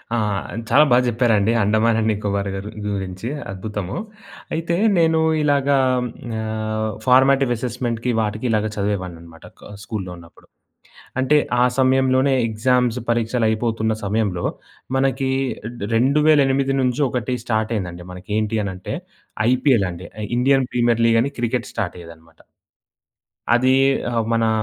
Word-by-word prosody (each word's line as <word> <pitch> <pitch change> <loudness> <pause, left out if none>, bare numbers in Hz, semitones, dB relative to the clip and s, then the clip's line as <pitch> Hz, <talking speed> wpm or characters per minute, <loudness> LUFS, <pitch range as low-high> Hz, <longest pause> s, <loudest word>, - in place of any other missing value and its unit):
ఆ! - - +1 0.5
చాలా 150 +2 +6
బా 120 - +6
చెప్పారండి. 115 -3 +2
అండమాన్ 110 +2 +2
అండ్ 110 0 +1
నికోబార్ 100 -1 -2
గారు 100 +2 -6 0.2
గురించి, 95 0 -4 0.2
అద్భుతము. 100 -1 -5 0.6
అయితే, 165 +1 -1 0.2
నేను 165 -1 +3 0.2
ఇలాగా 140 -1 +2 0.6
ఆహ్, 110 0 -2 0.2
ఫార్మేటివ్ 135 +1 +4
అసెస్మెంట్‌కి 120 0 -2
వాటికి 110 +2 -3
ఇలాగా 110 -1 +1
చదివేవాడిననమాట 90 -5 -4
క - - -12
స్కూల్‌లో 100 -5 -5
ఉన్నప్పుడు. 85 0 -17 0.7
అంటే, 150 +3 +3 0.2
ఆ - - +6 0.2
సమయంలోనే 130 +1 +3
ఎగ్జామ్స్, 125 +2 +1
పరీక్షలయిపోతున్న 115 -1 0
సమయంలో, 100 -4 -1 0.5
మనకీ 135 0 0 0.5
డ్ - - -5
2008 135 +1 +3
నుంచి 125 +3 0
ఒకటి 125 +1 -2
స్టార్టయిందండి 105 -7 -2
మనకి. 90 +3 -12
ఏంటి 110 +1 -1
అనంటే, 100 +2 -5 0.5
ఐపీఎల్ 125 -4 +3
అండి. 90 +2 -9 0.2
I - - -2
Indian 135 +1 +3
premier 120 -1 +2
లీగని 115 +4 +2
cricket 120 0 -1
స్టార్టయ్యేదనమాట. 85 -5 -7 1.1
అదీ 130 +2 +3 0.4
ఆహ్, 115 -2 0
మనా 115 -1 +2
115 Hz, 115 wpm, -21 LUFS, 105-130 Hz, 1.1 s, చాలా